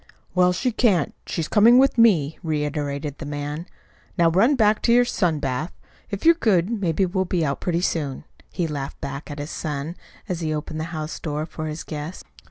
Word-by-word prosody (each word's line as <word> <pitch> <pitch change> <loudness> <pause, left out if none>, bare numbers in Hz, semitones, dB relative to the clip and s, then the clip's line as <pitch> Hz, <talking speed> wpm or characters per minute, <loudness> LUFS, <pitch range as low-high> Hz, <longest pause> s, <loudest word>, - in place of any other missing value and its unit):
"Well, 180 0 +4
she 245 +8 0
can't. 205 - +2
She's 160 -2 -2
coming 225 +3 +6
with 270 +1 +5
me," 180 - +4
reiterated 150 -3 -2
the 155 - -6
man. 145 +3 -4 0.5
"Now 170 -1 +4
run 225 - +4
back 215 -3 +3
to 235 - +2
your 245 +1 +6
sun 180 -9 +1
bath. 145 +4 -2 0.4
If 200 +5 -5
you're 335 - +8
good 205 - +2
maybe 190 -4 +1
we'll 190 +1 -1
be 175 -2 0
out 140 -1 -2
pretty 175 -1 0
soon," 145 -7 -2 0.3
he 175 - -1
laughed 145 -3 -5
back 140 +3 -6
at 145 - -6
his 145 +2 -5
son, 150 +1 -4 0.3
as 180 -4 -2
he 155 -2 -1
opened 155 +1 -5
the 160 - -2
house 155 -2 -5
door 150 -1 -3
for 155 -1 -6
his 155 +1 -5
guest. 155 +3 -6
165 Hz, 195 wpm, -23 LUFS, 150-190 Hz, 0.5 s, you're